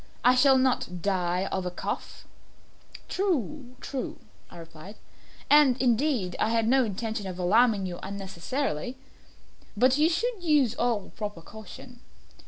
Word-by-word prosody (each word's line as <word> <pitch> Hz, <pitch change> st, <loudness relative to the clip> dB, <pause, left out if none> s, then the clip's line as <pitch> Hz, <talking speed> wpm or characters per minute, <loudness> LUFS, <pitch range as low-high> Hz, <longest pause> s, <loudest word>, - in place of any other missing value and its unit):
I 250 Hz, -, +6 dB
shall 265 Hz, +1 st, +5 dB
not 245 Hz, -9 st, 0 dB
die 180 Hz, -2 st, 0 dB
of 190 Hz, -, -1 dB
a 180 Hz, -, -2 dB
cough." 180 Hz, -, -6 dB, 0.8 s
"True 295 Hz, -, -2 dB
true," 270 Hz, -2 st, -5 dB, 0.3 s
I -, -, -13 dB
replied; 165 Hz, +4 st, -11 dB, 0.5 s
"and, 285 Hz, -4 st, +5 dB
indeed, 240 Hz, -, +1 dB
I 220 Hz, -, +2 dB
had 225 Hz, -1 st, +1 dB
no 265 Hz, +2 st, +4 dB
intention 220 Hz, -1 st, -3 dB
of 185 Hz, -1 st, -6 dB
alarming 205 Hz, +2 st, +3 dB
you 175 Hz, -1 st, -5 dB
unnecessarily 195 Hz, -, -4 dB, 0.8 s
but 255 Hz, +5 st, +4 dB
you 310 Hz, +2 st, +5 dB
should 435 Hz, +5 st, -1 dB
use 295 Hz, -8 st, +3 dB
all 235 Hz, -5 st, -1 dB
proper 205 Hz, -6 st, -6 dB
caution. 220 Hz, +5 st, -12 dB
230 Hz, 135 wpm, -27 LUFS, 190-265 Hz, 0.8 s, I